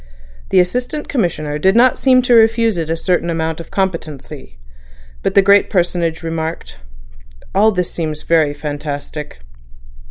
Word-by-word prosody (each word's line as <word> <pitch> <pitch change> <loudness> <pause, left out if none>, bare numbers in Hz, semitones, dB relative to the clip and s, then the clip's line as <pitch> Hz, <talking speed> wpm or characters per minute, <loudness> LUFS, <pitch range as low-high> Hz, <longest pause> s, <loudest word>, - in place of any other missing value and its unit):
The - - +4
Assistant 250 +11 -1
Commissioner 155 - -2
did 190 +6 +3
not 250 +2 +5
seem 255 -1 +3
to 245 - +2
refuse 225 -1 +4
it 165 -2 -3
a 165 - -1
certain 175 0 0
amount 160 -1 -2
of 165 - -9
competency. 155 - -4 0.6
But - - -2
the 200 - +6
great 200 +1 +4
personage 175 -3 -1
remarked: 165 - -5 0.7
"All 215 +3 +4
this 180 -3 -2
seems 155 -3 -4
very 155 -3 +2
fantastic." 145 - -6
170 Hz, 140 wpm, -17 LUFS, 155-200 Hz, 0.7 s, the